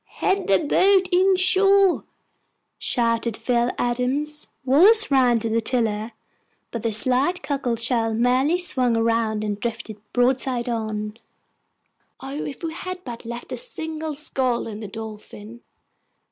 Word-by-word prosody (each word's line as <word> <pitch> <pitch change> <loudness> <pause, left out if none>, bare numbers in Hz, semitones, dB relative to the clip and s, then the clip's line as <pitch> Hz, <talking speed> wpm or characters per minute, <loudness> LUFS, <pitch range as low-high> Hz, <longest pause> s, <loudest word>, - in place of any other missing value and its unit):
"Head 390 0 0
the 195 - +4
boat 375 - +3
in 375 +2 +4
shore!" 385 0 +3 0.7
shouted 230 -2 0
Phil 240 -1 0
Adams. 265 +5 -1 0.2
Wallace 385 - +5
ran 250 -3 +4
to 225 - -1
the 230 +1 +1
tiller; 220 -2 -1 0.6
but 230 - -4
the 230 0 -1
slight 260 - +2
cockle 275 -5 -1
shell 230 -1 0
merely 250 +8 +2
swung 255 -9 +1
round 225 -1 0
and 205 -1 -3
drifted 225 -2 -5
broadside 250 0 +1
on. 215 -2 -3 1.0
O, 270 - -8
if 280 - -8
we 325 -1 -3
had 365 +1 -7
but 235 -2 -8
left 235 +1 -7
a - - -3
single 320 -10 -3
scull 260 -4 -1
in 215 -2 -7
the 215 - -6
Dolphin! 220 +1 -9
245 Hz, 135 wpm, -23 LUFS, 225-305 Hz, 1.0 s, Wallace